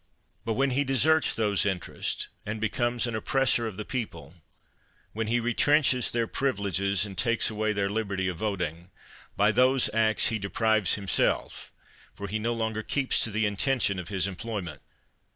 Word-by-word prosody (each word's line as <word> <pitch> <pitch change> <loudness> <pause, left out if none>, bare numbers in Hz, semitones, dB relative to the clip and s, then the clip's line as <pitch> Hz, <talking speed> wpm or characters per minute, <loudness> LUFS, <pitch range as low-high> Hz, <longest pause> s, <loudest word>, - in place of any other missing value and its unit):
But 115 - 0
when 135 +4 +1
he 140 +3 +1
deserts 145 +3 +3
those 105 -5 +1
interests, 95 -3 -3 0.2
and 105 +1 -4
becomes 120 +2 0
an 120 - -3
oppressor 120 0 +1
of 105 -4 -7
the 105 - -5
people; 85 - -5 0.8
when 110 0 -2
he 120 +2 +2
retrenches 125 +2 +3
their 115 -1 0
privileges, 100 -6 0
and 100 -2 -8
takes 115 +3 +1
away 110 0 0
their 100 -1 0
liberty 100 -2 -2
of 90 -2 -3
voting; 90 -4 -3 0.5
by 105 +2 +4
those 130 +3 +3
acts 110 -1 +2
he 110 - -2
deprives 110 -1 +1
himself, 100 -5 0 0.4
for 100 - -6
he 110 +3 -2
no 115 +2 -1
longer 110 -1 -2
keeps 135 +4 0
to - - +1
the 110 +1 0
intention 105 -1 0
of 90 - -7
his 95 -2 -1
employment. 95 -4 -5
110 Hz, 165 wpm, -27 LUFS, 100-120 Hz, 0.8 s, by